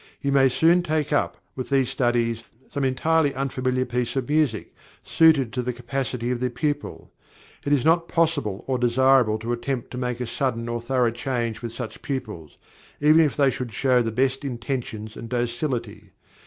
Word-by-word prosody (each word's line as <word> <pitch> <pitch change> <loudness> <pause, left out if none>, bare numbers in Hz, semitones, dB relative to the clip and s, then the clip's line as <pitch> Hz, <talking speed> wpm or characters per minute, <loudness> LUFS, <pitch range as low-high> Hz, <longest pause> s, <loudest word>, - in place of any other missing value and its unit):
You 140 - -1
may 135 -1 +5
soon 165 +7 +4
take 155 -3 -1
up, 145 - 0 0.2
with 130 - -5
these 135 -2 +2
studies, 120 -3 0 0.3
some 140 -2 -2
entirely 145 +3 +2
unfamiliar 130 -1 -1
piece 125 0 -2
of 130 -3 -1
music, 145 -7 0 0.3
suited 155 -7 +4
to 125 - -1
the 125 0 -3
capacity 125 0 -3
of 125 - -1
the 125 0 0
pupil. 145 +4 -3 0.5
It 145 - -2
is 140 -4 +2
not 165 +1 +3
possible 155 - 0
or 130 -2 -1
desirable 125 -2 +4
to 115 +2 -3
attempt 120 +1 -3
to 125 - -5
make 125 -1 -2
a 125 - -2
sudden 120 -2 -2
and 120 0 -3
thorough 125 -1 +1
change 120 -2 -3
with 120 -1 -5
such 115 -1 -7
pupils, 110 - -5 0.4
even 155 +2 +6
if 150 -3 +1
they 140 -2 +4
should 125 -4 -5
show 125 +1 +3
the 115 -1 -1
best 130 +4 0
intentions 120 -4 -4
and 115 - -8
docility. 120 -4 -3
125 Hz, 180 wpm, -24 LUFS, 120-140 Hz, 0.5 s, even